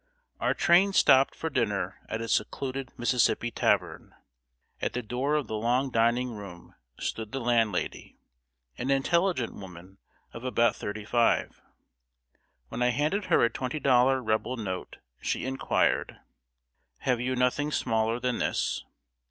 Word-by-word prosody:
] 485 - -46
Our - - +1
train 190 +3 +4
stopped 135 -6 +5
for 160 - -4
dinner 105 -8 -1
at 110 - -3
a 115 - -4
secluded 135 +2 -2
Mississippi 120 0 +1
tavern. - - 0 0.7
At - - -1
the 125 - -3
door 130 +6 -1
of 150 -3 0
the 110 - -4
long 125 +5 0
dining 120 +2 +2
room 100 -5 -10 0.3
stood 110 -2 -4
the 135 - -3
landlady, 115 -6 -1 0.6
an 125 - -2
intelligent 155 0 +1
woman 95 0 -12 0.3
of 115 - -9
about 120 -2 +2
thirty 105 0 -6
five. 120 +1 +1 1.1
When - - -5
I 125 - +4
handed 150 +11 0
her - - +3
a 120 - +4
twenty 130 +3 -3
dollar 130 -1 +3
Rebel 110 +3 -1
note, 95 -5 -5 0.2
she - - -2
inquired 135 +1 0 0.8
"Have 125 -2 0
you 130 +1 -1
nothing 125 +4 +1
smaller 115 -3 0
than 125 -1 -1
this?" - - -1
125 Hz, 145 wpm, -28 LUFS, 115-135 Hz, 1.1 s, stopped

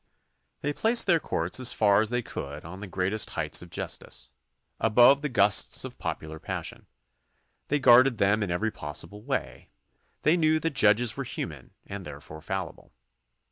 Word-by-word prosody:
They 145 - -2
placed 230 +8 +3
their 170 -4 +3
courts 85 - -1
as 130 - +2
far 100 -1 +3
as 110 - -1
they 120 0 -1
could 75 -6 -7
on 90 +3 -9
the 100 - -7
great 95 +2 -2 0.2
heights - - -1
of - - -12
justice, - - -4 0.5
above 125 +5 +5
the 150 - -2
gusts 105 -5 +2
of - - -10
popular 80 0 -5
passion. - - -6 0.8
They 150 - +1
guarded 130 -2 +5
them 100 +2 +2
in 100 - -2
every 105 +6 -1
possible 85 +7 -4
way. 135 +5 -4 0.5
They 155 +3 +3
knew 155 -1 +2
that 165 -2 -2
judges 110 -2 +3
were 140 - -4
human 75 - -7
and 100 -1 -7
therefore 75 0 -10
fallible. 95 +3 -6
105 Hz, 165 wpm, -27 LUFS, 90-135 Hz, 0.8 s, above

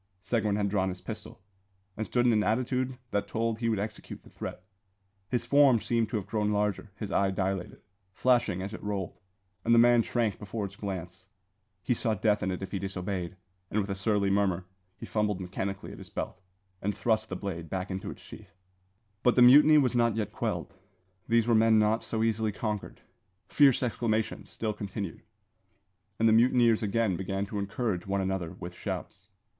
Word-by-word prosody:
Seguin 110 -4 0
had 105 -1 +1
drawn 95 -1 +1
his 90 0 -6
pistol, 95 - -8 0.5
and 110 - -3
stood 120 -1 +1
in 120 - +5
an 105 - +3
attitude 125 +3 0
that 100 - 0
told 115 0 -1
he 115 -1 0
would 110 - +1
execute 105 +2 -6
the - - -17
threat. 90 - -7 0.7
His 120 -2 -1
form 135 -1 +5
seemed 115 +1 0
to 115 - -3
have 105 -3 -2
grown 105 0 0
larger; 105 0 -1
his 105 -3 -6
eye 100 0 +2
dilated, 95 -1 -3 0.3
flashing 120 -5 +2
as 100 +2 -5
it - - -7
rolled, 100 -3 -4 0.4
and 115 +1 +4
the - - +5
man 120 0 +6
shrank 115 -3 -1
before 105 +1 -4
its 100 0 -8
glance. 95 -2 -6 0.6
He - - +2
saw 115 -2 0
death 105 +1 +1
in 95 - -1
it 95 +1 -3
if 95 - -6
he 100 - -2
disobeyed, 95 -2 -4 0.3
and 105 - 0
with 100 -1 -2
a - - -1
surly 100 0 +1
murmur 95 -3 +1 0.3
he - - -8
fumbled 105 -3 0
mechanically 95 +1 -4
at - - -10
his - - -10
belt, 90 - -5 0.4
and 100 0 -2
thrust 110 -2 +1
the 95 - -3
blade 85 -4 -5
back 95 +1 -3
into 95 0 -4
its - - -10
sheath. - - -13 0.7
But 125 - +3
the 125 - +7
mutiny 150 +5 +8
was 130 -4 +3
not 120 -2 +2
yet 105 -2 -2
quelled. 90 -7 -3 0.5
These 115 -1 +3
were 120 - +2
men 110 0 +5
not 110 +1 +3
so 110 -1 -2
easily 110 -1 +1
conquered. 105 0 -4 0.5
Fierce 140 -4 +5
exclamations 110 -2 -1
still 110 -1 -3
continued, 100 -3 -5 1.0
and 115 - +3
the 110 - +5
mutineers 120 -1 +4
again 105 -2 +1
began 95 +1 -2
to 105 0 -4
encourage 100 -2 -2
one 100 0 0
another 95 -3 -2
with 90 0 -8
shouts. - - -6
105 Hz, 190 wpm, -29 LUFS, 95-115 Hz, 1.0 s, mutiny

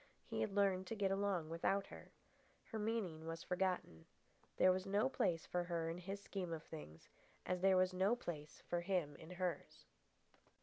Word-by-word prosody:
He - - -2
had 200 - -1
learned 190 -2 +3
to 225 - -3
get 200 -2 +1
along 195 -5 +1
without 195 +4 +1
her. - - -11 0.6
Her 220 - -2
meaning 205 -8 -1
was 165 0 -4
forgotten. 180 - -1 0.5
There 185 - +7
was 185 +1 -1
no 205 +5 +3
place 170 -10 +1
for 175 0 -1
her 170 -2 -1
in 170 - -5
his 195 +3 -4
scheme 195 -3 -4
of 160 -1 -4
things, 80 - -9 0.4
as 180 -1 0
there 190 -1 +6
was 185 0 +4
no 190 +5 +3
place 155 -10 -6
for 175 0 0
him 175 -5 0
in 160 - -11
hers. 180 -1 -3
185 Hz, 180 wpm, -40 LUFS, 165-195 Hz, 0.6 s, There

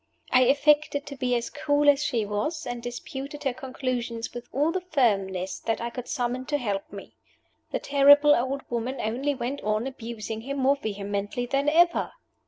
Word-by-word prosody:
I 255 0 +6
affected 290 +2 +3
to 280 - -7
be 255 -2 0
as 235 0 -2
cool 290 0 +1
as 290 0 +5
she 235 -7 0
was; 265 +10 -2
and 245 -1 -4
I - - -11
disputed 270 +4 -6
her 265 -3 0
conclusions 250 -3 -4
with 240 0 -7
all 295 +5 +1
the 370 +1 -2
firmness 195 - 0
that 225 - -1
I 235 0 -4
could 250 0 -7
summon 250 +1 -2
to 295 -1 +1
help 205 -7 -3
me. 200 -1 -10 0.6
The - - -1
terrible 285 +1 +6
old 265 +2 0
woman 240 +3 -2
only 265 +6 -1
went 260 +3 -4
on 215 +2 0
abusing 225 -4 -6
him 275 +4 -4
more 275 +1 +3
vehemently 205 0 -3
than 275 +3 +1
ever. 345 +3 +3
255 Hz, 185 wpm, -26 LUFS, 230-285 Hz, 0.6 s, I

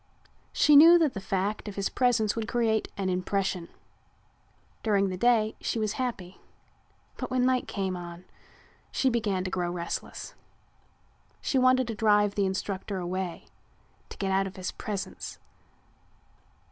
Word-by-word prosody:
She 300 - +5
knew 330 +4 +10
that 315 -6 +2
the 195 - -5
fact 195 +3 -2
of 205 - -6
his 200 -1 0
presence 240 -4 +2
would 225 -1 -3
create 225 -3 +1
an 195 -1 -1
impression. 185 -1 -1 1.1
During 200 -3 +2
the 185 - -3
day 220 +1 +2
she - - -2
was 215 -1 -1
happy, 195 -8 -4 0.8
but - - -4
when 255 -1 +1
night 255 -1 +1
came 190 -2 -2
on 175 0 -8 0.7
she 265 - +1
began 205 -6 0
to 185 - -4
grow 180 -2 -1
restless. 170 -1 -5 1.1
She 265 - 0
wanted 255 0 +4
to 230 - -3
drive 205 -1 +3
the 200 -1 +1
instructor 190 +1 -3
away, 180 0 -4 0.6
to - - -10
get 195 -1 -1
out 195 0 +2
of 190 - -9
his 185 -2 -4
presence. 200 -3 -6
200 Hz, 145 wpm, -28 LUFS, 190-235 Hz, 1.1 s, knew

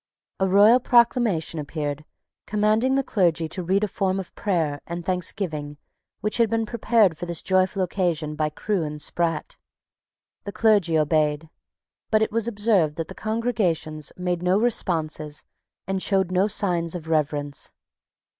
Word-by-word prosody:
A 190 0 +1
royal 205 +6 +6
proclamation 235 -10 +2
appeared 150 0 -4 0.4
commanding 215 +5 +2
the 275 - +2
clergy 170 -8 +1
to 185 - -1
read 190 +4 +1
a - - +2
form 190 0 -1
of 190 - -8
prayer 160 -8 -1
and 170 0 -5
thanksgiving 170 -5 -3 0.4
which 210 - 0
had 230 -2 +3
been 225 0 0
prepared 220 -5 +2
for 175 - -6
this 170 -2 -3
joyful 185 0 +1
occasion 170 -5 -1
by 155 0 0
Crewe 195 +5 -2
and 150 -1 -4
Sprat. 165 0 -2 0.9
The 200 - -5
clergy 195 -6 +3
obeyed: 155 0 +1 0.6
but 215 0 +3
it - - -2
was 230 +1 -1
observed 205 -8 +1
that 165 -1 -5
the - - -7
congregations 195 - -2
made 180 -1 -2
no 180 +2 +2
responses 155 -9 -1 0.4
and 190 0 -2
showed 190 -2 +1
no 185 +2 +2
signs 175 -5 0
of 165 -2 -7
reverence. 145 -2 -1
180 Hz, 150 wpm, -24 LUFS, 155-210 Hz, 0.9 s, royal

